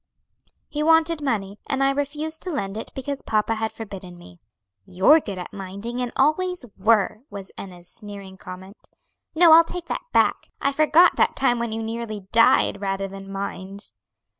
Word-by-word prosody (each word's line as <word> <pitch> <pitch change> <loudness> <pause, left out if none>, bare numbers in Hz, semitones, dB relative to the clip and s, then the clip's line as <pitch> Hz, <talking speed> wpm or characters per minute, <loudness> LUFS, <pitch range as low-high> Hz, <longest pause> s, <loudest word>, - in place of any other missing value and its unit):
"He 300 -1 -4
wanted 325 0 +3
money, 210 -7 -2
and 275 -1 +1
I 275 - +3
refused 295 +3 -3
to 370 - -3
lend 200 - -3
it 220 - -6
because 275 +1 -4
papa 215 +1 0
had 220 0 -2
forbidden 195 -5 -9
me." 90 - -15 0.4
"You're 190 - +5
good 200 -10 -6
at 180 - -7
minding, 200 +6 -5
and 245 -1 -2
always 330 +3 +1
were," 215 +1 +2
was 195 -2 -9
Enna's 180 -2 -10
sneering 200 -2 -9
comment. 190 +2 -12 0.5
"No, 335 0 +7
I'll 330 +1 +9
take 350 +1 -5
that - - -3
back; - - +2
I 275 - +1
forgot 310 +4 +4
that - - +2
time 245 -3 +2
when 235 -1 -2
you 225 0 -3
nearly 225 -2 -5
died 225 -3 +4
rather 195 0 -2
than 195 0 -10
mind." 195 0 -6
225 Hz, 170 wpm, -23 LUFS, 195-285 Hz, 0.5 s, I'll